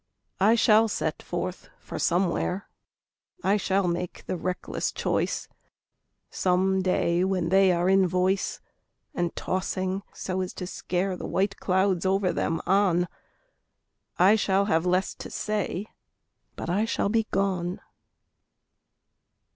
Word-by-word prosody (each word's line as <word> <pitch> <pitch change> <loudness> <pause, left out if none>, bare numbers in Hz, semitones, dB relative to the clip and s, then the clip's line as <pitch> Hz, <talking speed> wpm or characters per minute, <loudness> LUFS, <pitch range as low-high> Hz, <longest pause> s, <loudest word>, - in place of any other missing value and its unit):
I 210 +4 +5
shall 225 -1 +5
set 160 -7 -2
forth 180 +1 -5
for - - -7
somewhere, 180 +2 0 0.8
I 200 - +3
shall 195 -2 +1
make 175 0 -3
the - - -2
reckless 180 +1 -3
choice - - -1 0.8
Some 190 +1 +2
day 180 -1 +1
when 185 -3 0
they 190 0 +5
are 175 0 +1
in 190 0 +4
voice 185 +2 0 0.5
And 175 -1 -2
tossing 185 0 -2
so 185 0 -3
as 185 - -4
to 180 - -5
scare 185 +1 -2
The - - -6
white 200 +1 0
clouds 190 -1 +1
over 190 -1 +1
them 165 - -1
on. 180 -2 +3 1.1
I 195 +4 +6
shall 200 -2 +2
have 165 -3 +1
less 185 +1 +1
to - - -9
say, 210 -2 -2 0.7
But - - -6
I 200 +5 +1
shall 225 - 0
be 225 0 +1
gone. 185 -2 -1
185 Hz, 130 wpm, -26 LUFS, 180-195 Hz, 1.1 s, I